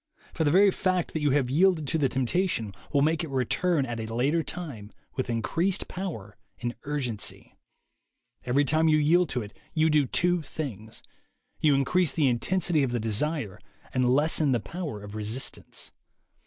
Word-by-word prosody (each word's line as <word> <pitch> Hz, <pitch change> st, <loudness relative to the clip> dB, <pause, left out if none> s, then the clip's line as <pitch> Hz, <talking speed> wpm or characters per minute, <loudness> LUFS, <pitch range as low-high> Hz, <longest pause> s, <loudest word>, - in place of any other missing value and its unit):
For 165 Hz, -, 0 dB
the 150 Hz, -, +3 dB
very 195 Hz, +5 st, +6 dB
fact 185 Hz, -2 st, -1 dB
that 160 Hz, -, -2 dB
you 150 Hz, -, +2 dB
have 135 Hz, -2 st, +1 dB
yielded 165 Hz, 0 st, +3 dB
to 160 Hz, -, +1 dB
the 135 Hz, -3 st, +2 dB
temptation 130 Hz, -, -1 dB, 0.2 s
will 140 Hz, -2 st, +3 dB
make 160 Hz, +2 st, +1 dB
it 165 Hz, -, -5 dB
return 140 Hz, +4 st, +1 dB
at 120 Hz, -2 st, -4 dB
a 110 Hz, 0 st, -5 dB
later 140 Hz, +8 st, +1 dB
time 140 Hz, -13 st, -7 dB, 0.2 s
with 130 Hz, -2 st, -2 dB
increased 165 Hz, -, 0 dB
power 135 Hz, -, -6 dB, 0.2 s
and 120 Hz, 0 st, -3 dB
urgency. 130 Hz, -7 st, -4 dB, 0.9 s
Every 135 Hz, +4 st, +2 dB
time 155 Hz, +3 st, +2 dB
you 155 Hz, -1 st, +5 dB
yield 165 Hz, +3 st, +3 dB
to 125 Hz, -2 st, -2 dB
it, 105 Hz, -, -11 dB, 0.2 s
you 160 Hz, 0 st, +3 dB
do 150 Hz, -3 st, +3 dB
two 175 Hz, +5 st, +1 dB
things: 115 Hz, -8 st, -7 dB, 0.6 s
you 150 Hz, -3 st, +4 dB
increase 150 Hz, +4 st, +2 dB
the 150 Hz, -4 st, +2 dB
intensity 165 Hz, +6 st, +1 dB
of 135 Hz, -, +1 dB
the 120 Hz, 0 st, -1 dB
desire 110 Hz, -, 0 dB, 0.3 s
and 125 Hz, -1 st, +2 dB
lessen 145 Hz, +1 st, +2 dB
the 120 Hz, -, +2 dB
power 150 Hz, -, -6 dB
of 105 Hz, 0 st, -9 dB
resistance. 110 Hz, +4 st, -4 dB
145 Hz, 170 wpm, -27 LUFS, 120-165 Hz, 0.9 s, very